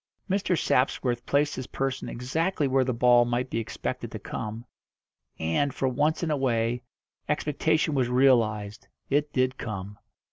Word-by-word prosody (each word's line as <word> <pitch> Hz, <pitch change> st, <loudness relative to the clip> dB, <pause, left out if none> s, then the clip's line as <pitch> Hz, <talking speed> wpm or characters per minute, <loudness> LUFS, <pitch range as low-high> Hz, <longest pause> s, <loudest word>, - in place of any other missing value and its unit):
Mr. 190 Hz, -3 st, +1 dB
Sapsworth 125 Hz, -2 st, +1 dB
placed 145 Hz, +1 st, +2 dB
his 130 Hz, -1 st, -5 dB
person 135 Hz, -1 st, -3 dB
exactly 150 Hz, +6 st, -1 dB
where 135 Hz, 0 st, +3 dB
the 130 Hz, -, 0 dB
ball 120 Hz, 0 st, +5 dB
might 120 Hz, +2 st, -1 dB
be 115 Hz, -, 0 dB
expected 115 Hz, -, -4 dB
to -, -, -5 dB
come, 110 Hz, +2 st, -6 dB, 0.7 s
and, 80 Hz, -, 0 dB
for 135 Hz, -, 0 dB
once 150 Hz, +6 st, +1 dB
in 160 Hz, -, 0 dB
a 150 Hz, -, +1 dB
way, 120 Hz, -2 st, 0 dB, 0.5 s
expectation 155 Hz, +1 st, +1 dB
was 130 Hz, -3 st, +1 dB
realised 115 Hz, -5 st, +2 dB, 0.2 s
it 145 Hz, +1 st, +2 dB
did 130 Hz, 0 st, 0 dB
come. 100 Hz, -2 st, -6 dB
130 Hz, 150 wpm, -27 LUFS, 120-145 Hz, 0.7 s, ball